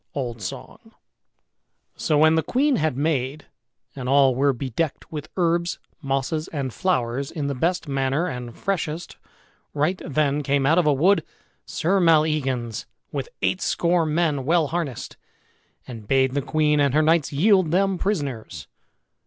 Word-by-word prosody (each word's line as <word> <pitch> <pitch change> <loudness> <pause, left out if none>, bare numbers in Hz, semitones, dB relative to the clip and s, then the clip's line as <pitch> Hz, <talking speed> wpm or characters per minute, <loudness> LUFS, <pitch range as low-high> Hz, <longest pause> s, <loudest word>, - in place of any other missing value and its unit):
Old 120 -5 -4
Song. 95 - -8 1.0
So 150 - 0
when 155 +1 +5
the 160 - +3
queen 265 - +1
had 155 -5 0
mayed, 145 -1 -1 0.5
and 130 -2 -5
all 135 -1 +5
were 140 +3 +2
bedecked 135 +4 -3
with 150 -2 -6
herbs, 170 0 +1 0.2
mosses, 135 +2 -2
and 135 -5 -4
flowers 135 -7 -1
in 150 -3 -4
the 140 - -1
best 170 +6 -1
manner 135 +3 0
and 125 -7 -6
freshest, 175 -4 -3 0.6
right 155 +6 0
then 150 -2 0
came 140 -1 +1
out 160 +5 +4
of 170 - +2
a - - +5
wood 175 +9 +3 0.4
Sir 185 +4 +1
Maleagans 150 - +1 0.2
with 140 -2 -4
eightscore 175 -2 +1
men 150 -3 +1
well 160 +1 +2
harnessed, 160 -8 -4 0.7
and 115 -5 -9
bade 130 +1 +3
the 140 - 0
queen 150 +1 +1
and 140 -1 +2
her 155 - +4
knights 160 -1 +2
yield 185 +3 +3
them 190 +2 +1
prisoners. 130 - -3
150 Hz, 145 wpm, -23 LUFS, 135-165 Hz, 1.0 s, when